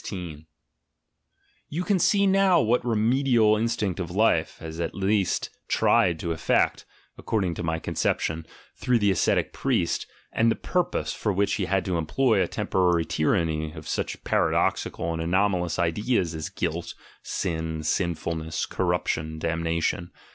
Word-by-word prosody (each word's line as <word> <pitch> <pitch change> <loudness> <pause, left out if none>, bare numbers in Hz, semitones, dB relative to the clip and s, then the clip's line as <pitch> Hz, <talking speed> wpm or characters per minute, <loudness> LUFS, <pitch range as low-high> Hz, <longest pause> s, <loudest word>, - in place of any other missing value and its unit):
You 165 +5 -2
can 195 0 +1
see 200 +3 +3
now 190 -2 +4
what 120 -2 +2
the 120 - -8
remedial 115 0 +3
instinct 110 -4 -1
of 85 -3 -3
life 105 +6 +1
has 80 0 -8
at 85 -1 -3
least 100 -1 0 0.2
tried 85 -2 +3
to 85 - -2
effect, 80 0 +1 0.3
according 95 -6 -1
to - - -6
my 80 0 -1
conception, 80 0 -1 0.3
through 125 -1 +1
the 105 -3 +3
ascetic 90 - +1
priest, - - 0 0.3
and 115 0 +3
the - - +2
purpose 180 -1 -1
for 105 - -1
which 100 +1 +1
he 100 - 0
had 95 +1 0
to 90 -3 0
employ 110 - +2
a 90 - +1
temporary 90 -3 +1
tyranny 80 -1 0
of 80 -2 -10
such - - -3
paradoxical 85 0 0
and 80 - -3
anomalous 90 0 +1
ideas 90 +1 0
as 80 -1 -4
"guilt," 85 +1 -3 0.3
"sin," 80 -3 -3
"sinfulness," 80 -1 -1
"corruption," 80 0 -1
"damnation." 85 +1 -1
90 Hz, 140 wpm, -26 LUFS, 80-110 Hz, 0.3 s, now